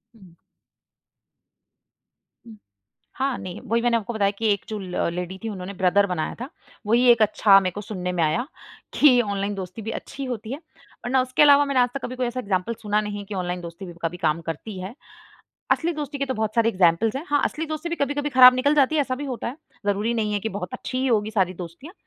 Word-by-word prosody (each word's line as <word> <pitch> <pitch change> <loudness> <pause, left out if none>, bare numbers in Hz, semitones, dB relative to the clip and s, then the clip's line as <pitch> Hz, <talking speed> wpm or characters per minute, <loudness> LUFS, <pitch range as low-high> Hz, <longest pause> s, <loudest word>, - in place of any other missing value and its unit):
हुँ। 190 -6 -17 2.8
हाँ 265 -1 -1
नहीं 180 -1 -7
वही 230 +2 +1
मैंने 235 0 +2
आपको 230 +1 -5
बताया 200 -2 +1
कि 225 - 0
1 200 - -6
जो 215 - -3
ल 180 -2 -2
लेडी 180 +1 -5
थी 225 - -3
उन्होंने 190 -1 -6
ब्रदर 195 +2 +3
बनाया 180 -4 -2
था। 255 - -5 0.4
वही 240 +3 +4
एक 235 -2 +3
अच्छा 205 -1 +6
मेरे 185 -2 -2
को 205 - -5
सुनने 185 -3 -4
में 175 -2 0
आया 160 +11 +1 0.5
कि 260 -5 +6
ऑनलाइन 200 -2 -2
दोस्ती 190 +2 -7
भी 220 +1 -4
अच्छी 275 +4 -6
होती 235 -3 -5
है - - -4 0.5
वरना 260 +2 +2
उसके 255 +2 0
अलावा 290 0 +7
मैंने 275 -2 +1
आज 245 0 +4
तक 275 - -4
कभी 255 - -5
कोई 255 -1 -1
ऐसा 245 +1 -4
एक्ज़ाम्पल 200 -1 -1
सुना 210 -1 +1
नहीं 210 -1 -5
है - - -6
कि 200 0 -6
ऑनलाइन 180 -1 -3
दोस्ती 170 +3 -8
भी 175 - -9
कभी 165 +1 -2
काम 165 -1 0
करती 165 +5 -6
है। 190 +4 -6 0.8
असली 340 +1 +1
दोस्ती 295 -2 -5
के 275 - -1
तो 260 - -2
बहुत 220 -1 -2
सारे 230 -1 +4
एक्ज़ाम्पल्स 185 +2 +2
हैं, 275 - -3
हाँ 290 -1 +2
असली 320 - -2
दोस्ती 310 +2 -4
भी 340 - -2
कभी-कभी 290 0 -1
खराब 255 -2 +9
निकल 285 +4 +2
जाती 290 +1 +3
है 300 - +4
ऐसा 260 -2 -2
भी 290 +3 -5
होता 255 -4 -4
है। 240 - -5 0.3
ज़रूरी 205 +3 0
नहीं 215 -2 -1
है 205 - 0
कि 220 - -3
बहुत 185 -3 -5
अच्छी 255 - -5
ही 260 +1 0
होगी 215 -3 +1
सारी 190 -4 +1
दोस्तियाँ। 180 - -9
220 Hz, 230 wpm, -24 LUFS, 190-255 Hz, 2.8 s, खराब